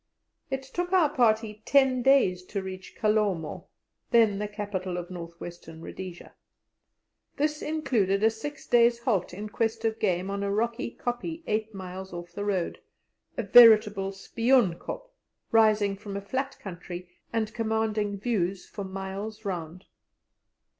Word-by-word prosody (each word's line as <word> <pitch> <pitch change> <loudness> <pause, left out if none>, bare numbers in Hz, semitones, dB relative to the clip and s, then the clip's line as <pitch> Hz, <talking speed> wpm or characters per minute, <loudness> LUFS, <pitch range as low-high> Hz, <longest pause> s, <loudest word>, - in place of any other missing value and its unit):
It 270 0 -2
took 350 +7 -4
our 335 -6 +5
party 220 -3 +2
ten 265 -2 +4
days 245 -9 +4
to 200 0 -4
reach 185 0 -8
Kalomo, 195 -5 0 0.4
then 225 -4 +4
the 210 - -2
capital 200 -3 -4
of 175 +1 -6
North 170 -1 -8
Western 165 -2 -9
Rhodesia. 180 +1 -8 1.0
This 300 +1 0
included 220 -11 +1
a 220 - +5
six 290 +7 -7
days' 235 0 +4
halt 215 -7 0
in 205 +4 -6
quest 225 +1 -1
of 225 0 0
game 185 -1 0
on 200 0 -2
a 200 - -1
rocky 230 +4 -1
kopje 320 +7 -3
eight 215 0 -2
miles 190 0 -7
off 175 0 -7
the 205 - -4
road 195 -4 -1 0.6
a 235 - 0
veritable 210 -3 +7
Spion 230 +1 +2
Kop, - - -7 0.4
rising 215 -3 +4
from 200 0 -6
a - - -4
flat 265 +7 -3
country 180 -1 -7 0.2
and 220 -2 -1
commanding 220 -2 0
views 195 -5 -1
for 200 - -7
miles 195 +3 -6
round. 175 -1 -5
210 Hz, 145 wpm, -28 LUFS, 190-235 Hz, 1.0 s, veritable